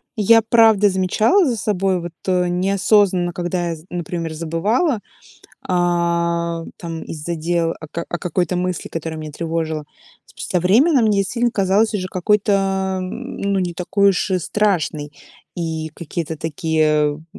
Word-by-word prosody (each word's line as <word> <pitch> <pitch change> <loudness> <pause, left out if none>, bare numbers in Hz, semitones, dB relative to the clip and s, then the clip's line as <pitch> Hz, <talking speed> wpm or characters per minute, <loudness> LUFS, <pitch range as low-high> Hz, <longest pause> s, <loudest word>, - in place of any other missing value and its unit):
я 225 +1 +5
правда 220 -2 +5
замечала 205 - +2
за 245 -5 0
собой 195 -3 0
вот, 175 0 -6 0.2
э, 180 -1 +2
неосознанно, 190 0 +2
когда 175 0 -2
я, 165 - -2
з 155 +1 -15
например, 170 -2 -4
забывала, 205 - 0 0.7
а, 170 -1 0
там 165 -2 -6
из-за 160 +2 -5
дел 165 +1 0
о 155 - -8
ка 170 +2 -5
о 175 - -3
какой-то 180 0 -1
мысли, 180 -2 -2
которая 160 -1 -5
меня 155 -1 -7
тревожила. 160 -1 -3 0.4
С - - -8
со 180 - +1
временем 240 - +4
мне 210 -2 +2
действительно 235 +5 0
казалась 205 +2 +2
уже 185 -3 -1
какой-то, 195 -1 +1
м, 185 0 -6
ну, 200 0 0
не 180 -2 -1
такой 195 +3 +2
уж 190 +1 -1
и 185 - +2
страшной. 170 -7 -1 0.5
И 160 -2 -3
какие-то 165 -1 -5
такие, 160 0 0 0.3
м, 160 - -16
180 Hz, 150 wpm, -20 LUFS, 165-200 Hz, 0.7 s, я